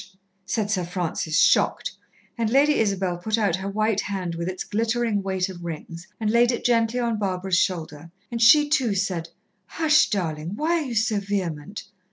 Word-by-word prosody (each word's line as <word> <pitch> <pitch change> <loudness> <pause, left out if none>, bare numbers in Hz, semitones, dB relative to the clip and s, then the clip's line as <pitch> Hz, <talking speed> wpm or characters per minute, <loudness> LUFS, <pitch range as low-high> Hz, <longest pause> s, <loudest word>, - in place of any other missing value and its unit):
said 205 +1 -1
Sir 185 -4 0
Francis, 170 -2 -2
shocked, - - +3 0.4
and 230 -2 -1
Lady 285 +5 +3
Isabel 190 -4 0
put 215 +5 -1
out 200 -5 +1
her 190 +1 -4
white 215 0 0
hand 185 -4 -4
with 170 +1 -4
its 185 0 -4
glittering 225 0 0
weight 190 -1 -1
of 180 -2 -9
rings 165 0 -7
and 215 -1 0
laid 240 +1 +4
it 240 - -4
gently 230 0 +2
on 235 -3 -1
Barbara's 185 -2 0
shoulder, 165 -3 -2 0.2
and 235 -1 -3
she 295 +6 +7
too 265 -9 +1
said, 180 -4 -2 0.4
"Hush, 310 -1 +3
darling! 165 -3 -3
why 330 +6 +1
are - - -4
you 245 -3 -5
so 220 -1 +1
vehement? 195 -2 -4
200 Hz, 180 wpm, -24 LUFS, 180-230 Hz, 0.4 s, she